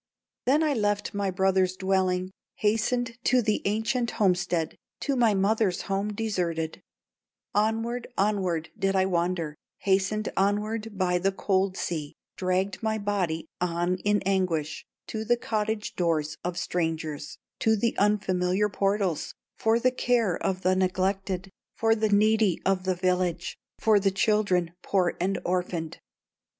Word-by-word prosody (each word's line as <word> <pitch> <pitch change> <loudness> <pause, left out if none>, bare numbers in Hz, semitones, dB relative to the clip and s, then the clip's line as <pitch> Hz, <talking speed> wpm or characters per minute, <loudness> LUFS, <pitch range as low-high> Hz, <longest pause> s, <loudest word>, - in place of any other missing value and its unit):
"Then 290 +5 +4
I 305 -2 +2
left 205 -4 0
my 200 -1 0
brother's 190 0 +2
dwelling, 185 -1 0 0.2
Hastened 230 +3 0
to 255 - +4
the 215 -1 +1
ancient 225 +4 0
homestead, 180 -4 +1 0.3
To 280 - 0
my 230 -4 +3
mother's 200 -1 +1
home 195 +2 -1
deserted; 180 -7 -2 0.7
Onward, 225 +3 0
onward 190 -6 0
did 195 -2 0
I 190 0 +4
wander, 170 -3 0 0.3
Hastened 200 +2 +1
onward 210 +2 0
by 180 -2 +2
the 195 +2 +1
cold 190 -1 0
sea, 155 -4 -3 0.2
Dragged 185 +1 -1
my 220 -1 0
body 195 -6 -1
on 175 +1 0
in 205 +2 +1
anguish, 185 -6 -1 0.2
To 220 -1 -4
the 240 +2 +2
cottage 215 -2 -2
doors 160 -4 0
of 175 0 -3
strangers, 160 -4 -2 0.2
To 220 0 +3
the 230 +2 0
unfamiliar 195 -1 +2
portals, 195 -4 0 0.2
For 225 +1 +3
the 255 +2 +3
care 240 -7 +1
of 190 -1 -2
the 185 +1 +3
neglected, 190 0 -1 0.2
For 225 0 +3
the 220 -1 +1
needy 210 -2 +3
of 190 -1 +1
the 185 -1 +1
village, 180 -1 0 0.2
For 215 -2 +4
the 195 0 +2
children 190 -3 +2
poor 185 -3 +1
and 195 +2 +1
orphaned. 175 -3 -2
195 Hz, 140 wpm, -27 LUFS, 180-215 Hz, 0.7 s, Then